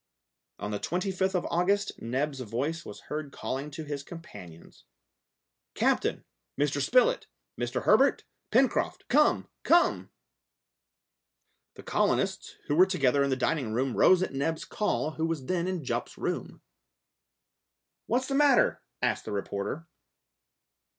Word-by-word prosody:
On 105 - -5
the 105 - -2
25th 190 +2 -1
of 180 - 0
August 195 +4 +1
Neb's 135 +4 -2
voice 130 +8 -3
was 105 - -10
heard 150 -1 -5
calling 135 +2 -4
to 150 +2 -7
his 145 -2 -4
companions. 105 - -12 0.9
"Captain, - - +1 0.3
Mr. 145 0 +1
Spilett, 255 - +3 0.3
Mr. - - -2
Herbert, - - +4 0.3
Pencroft, - - +1
come! - - +3
come!" 345 +1 +3 1.7
The - - -11
colonists, - - 0
who 145 - 0
were 185 +4 +6
together 140 -7 +2
in 140 - 0
the 130 - +2
dining 130 -3 -1
room, 130 +2 0
rose 185 0 +5
at 185 - -3
Neb's 160 +4 -2
call, 210 -7 -1
who 160 +1 -2
was 160 -5 -3
then 180 +3 -1
in 185 -4 -2
Jup's - - -3
room. - - -4 1.4
"What's 250 +3 +1
the 275 - -3
matter?" 280 -3 +4 0.2
asked - - 0
the - - -5
reporter. 100 +10 -4
150 Hz, 130 wpm, -28 LUFS, 130-185 Hz, 1.7 s, were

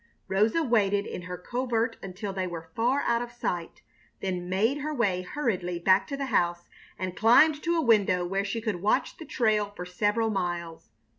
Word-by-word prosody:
Rosa 215 +11 +2
waited 205 -6 +2
in - - -6
her 180 0 -6
covert 235 +3 -1
until 195 +1 -6
they 190 -1 -2
were 165 -2 -8
far 250 +5 +2
out 235 0 +1
of 240 0 -5
sight, 180 -8 -4 0.4
then 180 -2 -3
made 220 +10 +1
her 300 +2 -3
way 205 -10 0
hurriedly 185 -6 -2
back 190 +3 +3
to 280 - -4
the 275 - -2
house 175 0 +1 0.3
and 185 0 -4
climbed 290 +9 +5
to 340 0 0
a - - +2
window 200 - +3
where 195 +2 -1
she 205 +3 -3
could 210 -6 -3
watch 205 - +1
the 320 - -9
trail 215 -6 +1
for 180 - -6
several 210 +5 0
miles. 175 -4 -3
205 Hz, 190 wpm, -27 LUFS, 180-235 Hz, 0.4 s, climbed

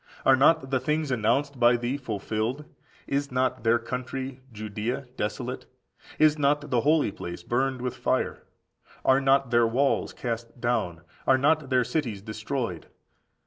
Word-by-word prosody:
Are 135 - +7
not 135 0 +3
the 130 - +2
things 150 0 -1
announced 125 +4 +1
by 120 0 +5
thee 120 +3 -2
fulfilled? 115 +2 -3 0.4
Is 140 0 -1
not 130 -2 0
their 115 0 +4
country, 130 +2 -5
Judea, 110 +4 -4
desolate? 120 +4 -4 0.5
Is 155 0 +4
not 145 +1 +1
the 120 -2 +3
holy 150 -5 +3
place 85 -2 -7
burned 130 +3 -1
with 125 - -2
fire? - - -1 0.6
Are 130 +1 +5
not 135 -1 +3
their 120 -1 +4
walls 135 +5 +1
cast 115 0 -5
down? 110 -9 -1 0.3
Are 130 - +6
not 145 +1 +2
their 130 -1 +3
cities 120 -10 -2
destroyed? 110 - -4
125 Hz, 145 wpm, -27 LUFS, 115-140 Hz, 0.6 s, Are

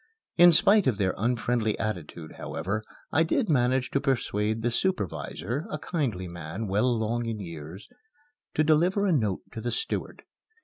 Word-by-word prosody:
In 175 0 +8
spite 200 +4 +5
of 120 -6 +2
their 95 -2 +1
unfriendly 115 0 0
attitude, 85 -6 -5
however, 95 +7 -3 0.3
I 160 - +3
did 180 +7 +1
manage 130 -2 +2
to 140 - +1
persuade 110 -5 0
the 120 - +1
supervisor, 140 - -2
a - - -3
kindly 130 - -2
man, 85 +5 -6
well 105 +5 +1
along 120 0 0
in 115 -2 -3
years, 85 0 -8 0.7
to 155 - +3
deliver 175 +6 +3
a 195 - +2
note 110 - +1
to 115 - -6
the - - -2
steward. 450 - -2
115 Hz, 160 wpm, -27 LUFS, 100-150 Hz, 0.7 s, In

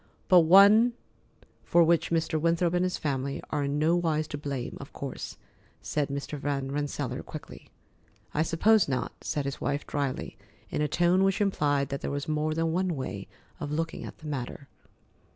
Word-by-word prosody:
"But 180 - +8
one 200 +8 +7 0.7
for 170 - +4
which 165 0 +2
Mr. 160 -1 0
Winthrop 170 +1 +2
and 180 0 +2
his 185 0 -1
family 140 -2 -2
are 145 -2 0
in 140 +1 -1
no 160 +3 +3
wise 155 -3 0
to 145 - -4
blame, 140 -4 -4
of 140 - -11
course," 140 - -6 0.5
said 150 -2 -1
Mr. 140 +1 -4
Van 135 -1 -2
Rensselaer 145 -2 -3
quickly. 155 - -10 0.6
"I 155 - +1
suppose 195 +6 +3
not," 130 - -1
said 145 -3 -2
his 140 +1 -4
wife 145 +1 -1
dryly, 140 -3 -3 0.3
in - - -1
a 150 - +2
tone 175 +4 +3
which 195 -1 +2
implied 145 -9 +1
that 140 - -4
there - - -3
was 145 0 -3
more 155 0 0
than 165 0 0
one 180 0 0
way 130 - -5 0.3
of 145 - -4
looking 165 +2 -2
at - - -8
the 155 - -14
matter. 140 -1 -5
150 Hz, 180 wpm, -28 LUFS, 140-170 Hz, 0.7 s, But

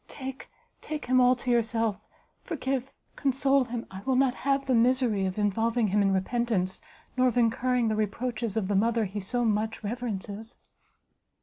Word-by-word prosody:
take, 265 -1 -8 0.3
take 305 -1 -5
him 255 +1 +4
all 250 0 +5
to 250 0 -2
yourself! 225 -2 0 0.3
forgive, 270 -5 -3 0.2
console 270 0 +2
him! 235 -1 -5
I 190 0 -7
will 260 +5 0
not 260 -1 +3
have 275 +1 0
the 265 - +1
misery 235 -4 +3
of 185 - -5
involving 225 +2 +1
him 205 +2 +2
in 195 -1 +3
repentance, 190 -1 0 0.3
nor 255 0 +3
of 245 - 0
incurring 245 +1 +2
the 220 -1 +1
reproaches 220 +1 -2
of 205 -4 0
the 205 - 0
mother 225 +2 +2
he 200 +2 -5
so 240 +5 -1
much 220 0 -1
reverences!" 220 -1 -5
235 Hz, 170 wpm, -28 LUFS, 210-255 Hz, 0.3 s, all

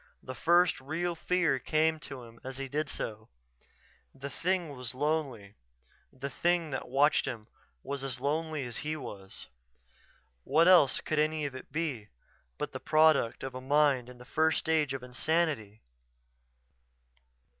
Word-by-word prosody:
The 130 - -6
first 170 +5 +3
real 165 +6 -2
fear 170 -4 +1
came 155 +4 +1
to 135 -4 -8
him 115 0 -14
as 130 0 -7
he 135 0 -4
did 150 +2 -2
so. 110 0 -6 0.9
The 140 +1 -7
thing 175 -4 -1
was 125 -1 -6
lonely 135 -8 -1 0.6
the 130 +1 -6
thing 170 +1 +1
that 130 - -4
watched 145 +3 +3
him 115 -5 -5 0.4
was 140 -1 -4
as 130 -2 -3
lonely 155 +2 -1
as 120 -2 -5
he 155 +1 -3
was.... 105 -9 -8 1.0
What 165 - +4
else 175 -8 +6
could 155 - -1
any 155 0 +1
of 140 - -4
it 130 - -10
be 140 -10 -3 0.5
but - - -3
the - - -6
product 155 -6 +3
of 135 - -4
a 130 - -6
mind 140 -2 +3
in 125 - -12
the 125 - -13
first 160 +3 +2
stage 155 -4 +1
of 130 - -6
insanity? 125 -5 -1
140 Hz, 155 wpm, -30 LUFS, 125-160 Hz, 1.0 s, else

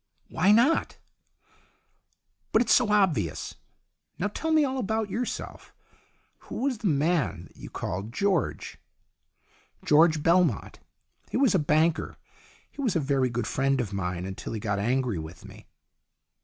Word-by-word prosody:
"Why 190 - +3
not?" 240 +10 +3 1.5
"But 220 - +4
it's - - +3
so 240 -4 +3
obvious. 145 - +1 0.6
Now 200 - -1
tell 320 +10 -4
me 310 -2 +4
all 265 -1 -2
about 220 -2 -2
yourself. 245 +2 -5 0.6
Who - - -7
was 265 -5 -1
the 215 - -1
man 150 - 0
that - - -26
you - - -9
called 100 +5 -5
George? 195 - -1 0.3
" - - -47
" - - -29
George 155 0 +4
Belmont. 170 - +2 0.5
He - - -2
was 265 -3 +3
a 190 - +3
banker. 155 +2 +1 0.5
He - - -8
was 235 -9 0
a - - +3
very 135 -3 +1
good 120 -1 -3
friend 135 +3 0
of 110 -5 -3
mine, 90 -2 -3
until 95 +3 -6
he 110 - -3
got 100 -1 -2
angry 120 -2 0
with 80 +2 -10
me." - - -14
155 Hz, 155 wpm, -27 LUFS, -, 1.5 s, But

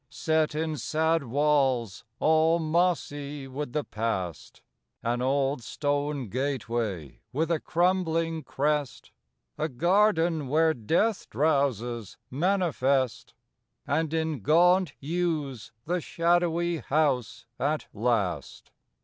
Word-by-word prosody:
Set 155 -1 0
in 155 0 -2
sad 160 +5 +1
walls, 130 -5 +1 0.2
all 160 +1 +4
mossy 155 -4 -1
with 135 0 -5
the 150 +2 -1
past, 95 - -4 0.4
An 120 +1 0
old 135 0 +1
stone 145 +2 -2
gateway 115 - -3
with 160 +5 -1
a 165 - +2
crumbling 165 -2 0
crest; 145 -2 -2 0.5
A 155 - 0
garden 170 - +2
where 160 +3 +3
death 170 - 0
drowses 120 -5 0
manifest; 140 - 0 0.5
And 155 +2 0
in 160 -3 -1
gaunt 175 - +4
yews 150 - -2
the 175 +2 -1
shadowy 170 +1 +1
house 135 -6 0
at 150 +2 0
last. 105 - -2
150 Hz, 100 wpm, -27 LUFS, 125-165 Hz, 0.5 s, all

